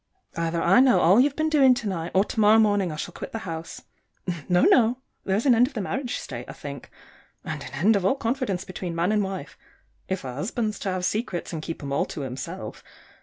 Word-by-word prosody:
Either 165 Hz, 0 st, -1 dB
I 180 Hz, +7 st, +5 dB
know 260 Hz, -1 st, +5 dB
all 185 Hz, +7 st, +5 dB
you've 280 Hz, +2 st, +3 dB
been 315 Hz, 0 st, 0 dB
doing 275 Hz, -5 st, +5 dB
to 230 Hz, -3 st, -4 dB
night, 170 Hz, -3 st, -3 dB
or 190 Hz, -, +5 dB
to 225 Hz, -, -5 dB
morrow 215 Hz, +1 st, +6 dB
morning 205 Hz, -5 st, +3 dB
I -, -, -5 dB
shall 170 Hz, +3 st, -5 dB
quit -, -, -8 dB
the -, -, -2 dB
house. 165 Hz, -2 st, -6 dB, 0.7 s
No, 180 Hz, 0 st, +4 dB
no! 240 Hz, 0 st, +5 dB, 0.3 s
There's 195 Hz, +5 st, 0 dB
an 265 Hz, -, +6 dB
end 240 Hz, +2 st, +5 dB
of 275 Hz, -, -12 dB
the 215 Hz, -, -1 dB
marriage 250 Hz, +5 st, -3 dB
state, 120 Hz, -2 st, -7 dB
I -, -, -6 dB
think 140 Hz, -2 st, -8 dB, 0.5 s
and -, -, -5 dB
an -, -, -8 dB
end 210 Hz, +6 st, +3 dB
of 200 Hz, -, 0 dB
all 195 Hz, -, +3 dB
confidence 235 Hz, -7 st, -2 dB
between 180 Hz, -2 st, -5 dB
man 170 Hz, +4 st, +1 dB
and 210 Hz, -1 st, +2 dB
wife 190 Hz, -1 st, -6 dB, 0.5 s
if 190 Hz, 0 st, -3 dB
a 130 Hz, -2 st, -5 dB
husband's 215 Hz, -, -2 dB
to 195 Hz, -, -3 dB
have 185 Hz, -1 st, -2 dB
secrets 190 Hz, -5 st, -2 dB
and 160 Hz, -, -3 dB
keep 165 Hz, -1 st, -6 dB
'em 140 Hz, -, -5 dB
all -, -, +1 dB
to 150 Hz, -, -7 dB
himself. 130 Hz, -1 st, -6 dB
195 Hz, 230 wpm, -25 LUFS, 170-230 Hz, 0.7 s, morrow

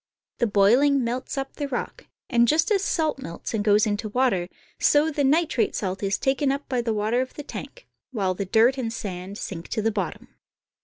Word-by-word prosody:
The 240 Hz, -, +2 dB
boiling 245 Hz, +7 st, +4 dB
melts 245 Hz, +4 st, -3 dB
up 270 Hz, 0 st, -4 dB
the 290 Hz, -, -2 dB
rock, 255 Hz, -3 st, -5 dB, 0.2 s
and 235 Hz, -2 st, +3 dB
just 320 Hz, -, +2 dB
as 395 Hz, -2 st, +2 dB
salt 315 Hz, -7 st, 0 dB
melts 170 Hz, -6 st, -7 dB
and 215 Hz, -2 st, 0 dB
goes 210 Hz, 0 st, +4 dB
into 215 Hz, +1 st, -2 dB
water, 210 Hz, -7 st, +1 dB, 0.3 s
so 300 Hz, +2 st, +4 dB
the 285 Hz, -1 st, 0 dB
nitrate 300 Hz, -1 st, +2 dB
salt 190 Hz, -1 st, -3 dB
is 195 Hz, -1 st, 0 dB
taken 270 Hz, +1 st, +1 dB
up 280 Hz, +1 st, -4 dB
by 250 Hz, -2 st, 0 dB
the 235 Hz, -1 st, -1 dB
water 220 Hz, +3 st, +1 dB
of 260 Hz, -, -5 dB
the 295 Hz, -, -6 dB
tank, -, -, -9 dB, 0.2 s
while 195 Hz, -7 st, -1 dB
the 200 Hz, +2 st, -4 dB
dirt 230 Hz, +7 st, +3 dB
and 230 Hz, -3 st, -2 dB
sand 195 Hz, -2 st, -6 dB
sink 170 Hz, -6 st, -6 dB
to 220 Hz, -, -2 dB
the 225 Hz, -, +2 dB
bottom. 195 Hz, -5 st, -4 dB
235 Hz, 205 wpm, -25 LUFS, 205-275 Hz, 0.3 s, boiling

